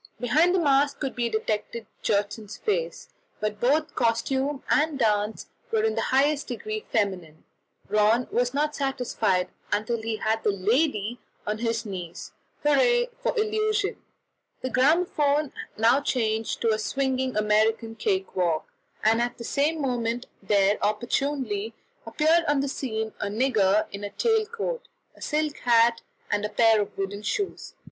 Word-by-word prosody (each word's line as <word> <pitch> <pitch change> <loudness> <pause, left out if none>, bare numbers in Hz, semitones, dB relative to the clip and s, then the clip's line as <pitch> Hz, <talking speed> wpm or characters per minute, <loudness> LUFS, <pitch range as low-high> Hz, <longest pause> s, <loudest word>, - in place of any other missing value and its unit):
Behind 315 +9 +3
the - - +3
mask 280 -2 +2
could 270 -3 -3
be 240 -1 0
detected 220 +1 -2 0.2
Gjertsen's 205 +1 -1
face, 485 +2 -2 0.3
but 215 -1 -2
both 300 +6 +2
costume 265 +4 0
and 300 -1 +2
dance 215 -3 0 0.3
were 445 -1 +2
in 440 0 +2
the - - -1
highest 285 +2 +2
degree 215 -3 -5
feminine. 185 -8 -1 0.4
Rönne 215 +4 +3
was 245 0 +1
not 300 +2 0
satisfied 230 -9 0 0.2
until 215 +2 0
he 225 0 -2
had 220 +1 0
the - - +2
"lady" 215 +3 0 0.3
on 215 +1 -2
his 230 -1 -1
knees 180 -5 -7 0.3
hurrah 485 +11 +3
for - - -1
illusion! 430 -1 0 0.6
The 255 - -3
gramophone 295 0 +2 0.2
now 235 +5 +4
changed 225 -5 -1
to 225 -1 +3
a 215 - -1
swinging 260 +2 -1
American 220 +2 +2
cake 385 - -1
walk, 170 -4 0 0.3
and 225 +2 +4
at 240 0 -2
the 235 - -7
same 295 +6 0
moment 245 -3 -1 0.2
there 200 0 +2
opportunely 225 0 -1 0.3
appeared 315 +8 +3
on 290 -1 +2
the 280 - -1
scene 220 -5 -3
a - - -2
nigger 210 -2 +2
in 200 0 -7
a 205 - -3
tail 445 - +1
coat, 470 +2 -4 0.3
a - - -19
silk 305 -1 -1
hat, 230 -1 +4 0.3
and 205 0 +1
a 210 - -1
pair 225 -1 +4
of 205 - -6
wooden 195 +1 -3
shoes. 385 - -3
235 Hz, 150 wpm, -26 LUFS, 215-290 Hz, 0.6 s, now